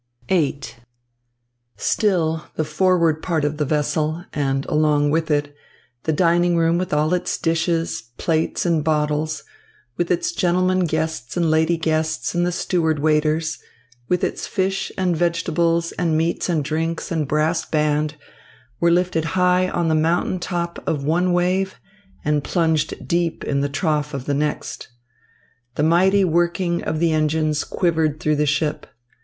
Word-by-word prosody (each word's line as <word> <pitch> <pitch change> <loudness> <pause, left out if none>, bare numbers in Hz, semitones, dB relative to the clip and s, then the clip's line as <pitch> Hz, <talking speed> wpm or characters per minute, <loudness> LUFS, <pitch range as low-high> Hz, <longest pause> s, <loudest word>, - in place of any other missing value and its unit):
VIII 155 -6 +1 1.2
Still 165 -7 +1
the 155 - 0
forward 165 0 +2
part 160 -5 0
of 145 +1 -1
the 150 - 0
vessel 155 +3 -1
and, 135 -2 -1
along 150 -1 +2
with 160 +1 0
it, 145 -1 0 0.5
the 160 - +2
dining 175 +2 +3
room 165 +1 +2
with 185 - -3
all 150 +3 +2
its 180 - -1
dishes, 165 -6 0 0.2
plates, 160 +1 0
and 165 -3 +2
bottles, 155 0 0 0.5
with 175 -1 -1
its 185 - +1
gentlemen 185 - +1
guests 160 -5 -3
and 170 -2 +2
lady 160 +2 +2
guests 160 -1 -1
and 175 0 +1
the - - 0
steward 165 -3 0
waiters, 155 +1 +1 0.5
with 180 - +1
its - - -2
fish 195 0 -1
and 180 -2 +1
vegetables 170 0 +1
and 165 -3 +1
meats 165 +3 0
and 160 -4 +1
drinks 165 +4 -2
and 160 -4 -1
brass 155 +3 +1
band, 150 0 0 0.6
were 170 - +3
lifted 175 -2 +1
high 180 0 +3
on 170 -2 -1
the 160 - +2
mountain 165 +4 +1
top 170 -1 -3
of 145 -3 -1
one 175 +5 +1
wave 185 +2 +1 0.5
and 150 -1 +1
plunged 160 -3 0
deep 170 -1 0
in 140 -1 0
the 140 - 0
trough 150 0 -1
of 135 -2 -5
the 145 - -1
next. 150 +1 -3 0.9
The 150 - 0
mighty 190 +5 +4
working 170 +1 0
of 155 - -1
the 170 0 +2
engines 155 -1 +1
quivered 160 -4 0
through 150 -1 +1
the 150 0 +1
ship. 150 +1 -1
160 Hz, 150 wpm, -21 LUFS, 150-175 Hz, 1.2 s, mighty